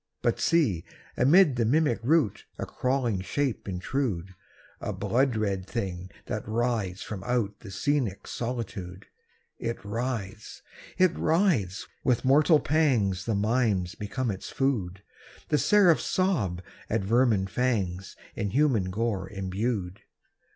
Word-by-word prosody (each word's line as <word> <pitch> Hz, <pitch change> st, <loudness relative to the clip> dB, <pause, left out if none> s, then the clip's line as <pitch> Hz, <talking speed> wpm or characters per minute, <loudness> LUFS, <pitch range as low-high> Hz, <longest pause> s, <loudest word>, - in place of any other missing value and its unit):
But -, -, +1 dB
see, 140 Hz, -, +2 dB, 0.3 s
amid 145 Hz, +1 st, +5 dB
the 120 Hz, -, +2 dB
mimic 140 Hz, +2 st, +2 dB
rout 140 Hz, -, +1 dB
A -, -, -3 dB
crawling 125 Hz, -7 st, -1 dB
shape 130 Hz, +1 st, -2 dB
intrude! 95 Hz, -1 st, -2 dB, 0.5 s
A -, -, -3 dB
blood 130 Hz, 0 st, +1 dB
red 100 Hz, -3 st, -1 dB
thing 95 Hz, -5 st, -4 dB, 0.2 s
that -, -, -3 dB
writhes 110 Hz, -4 st, -1 dB
from 100 Hz, -4 st, -6 dB
out 115 Hz, -4 st, -1 dB
The 100 Hz, -, -11 dB
scenic 110 Hz, +1 st, -1 dB
solitude! 110 Hz, -7 st, -5 dB, 0.5 s
It 115 Hz, 0 st, -2 dB
writhes!—it 115 Hz, -, -3 dB
writhes!—with 130 Hz, -, 0 dB
mortal 150 Hz, +4 st, +5 dB
pangs 120 Hz, -, +1 dB
The 115 Hz, -, 0 dB
mimes 105 Hz, -4 st, +1 dB
become 110 Hz, +4 st, -3 dB
its 95 Hz, -, -6 dB
food, 100 Hz, -9 st, -1 dB, 0.5 s
And 150 Hz, -, +4 dB
the 210 Hz, -, +2 dB
angels 180 Hz, -6 st, +5 dB
sob 110 Hz, -, 0 dB, 0.3 s
at 110 Hz, -2 st, 0 dB
vermin 110 Hz, -2 st, +3 dB
fangs 95 Hz, -5 st, -1 dB, 0.2 s
In 100 Hz, -, -2 dB
human 120 Hz, -6 st, +2 dB
gore 100 Hz, -2 st, -2 dB
imbued. 95 Hz, 0 st, -3 dB
115 Hz, 125 wpm, -27 LUFS, 95-130 Hz, 0.5 s, amid